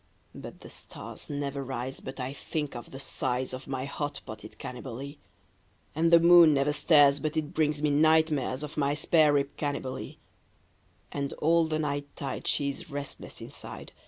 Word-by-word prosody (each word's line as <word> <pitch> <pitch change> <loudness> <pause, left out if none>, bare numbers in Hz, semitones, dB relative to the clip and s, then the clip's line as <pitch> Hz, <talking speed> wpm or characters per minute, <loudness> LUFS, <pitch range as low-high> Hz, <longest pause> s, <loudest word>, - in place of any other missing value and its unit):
But - - -10
the - - -11
stars - - -8
never 140 -1 -3
rise 130 0 -4
but 130 - -8
I 130 +1 -3
think 150 -1 -4
of 120 - -7
the 135 - -9
size 130 -1 -2
Of 130 - -7
my 135 -1 -3
hot 145 +1 -4
potted 110 0 -9
Cannibalee, 130 +3 -7 0.7
And 165 +2 +2
the 170 - +9
moon 170 -2 +8
never 140 +2 +2
stares 145 -2 +5
but 155 +2 -2
it 155 +1 -2
brings 150 -3 +1
me 150 - +3
night 160 +2 +5
mares 135 -1 -1
Of 150 0 -7
my 145 -1 +2
spare 155 0 +4
rib 140 0 0
Cannibalee; 140 -3 -4 0.9
And 140 -1 -3
all 165 +2 +3
the 155 -1 0
night 145 -2 -2
tide 135 -2 -4
she 140 -1 +1
is 140 - -10
restless 140 -1 -7
inside. - - -8
145 Hz, 175 wpm, -29 LUFS, 135-155 Hz, 0.9 s, the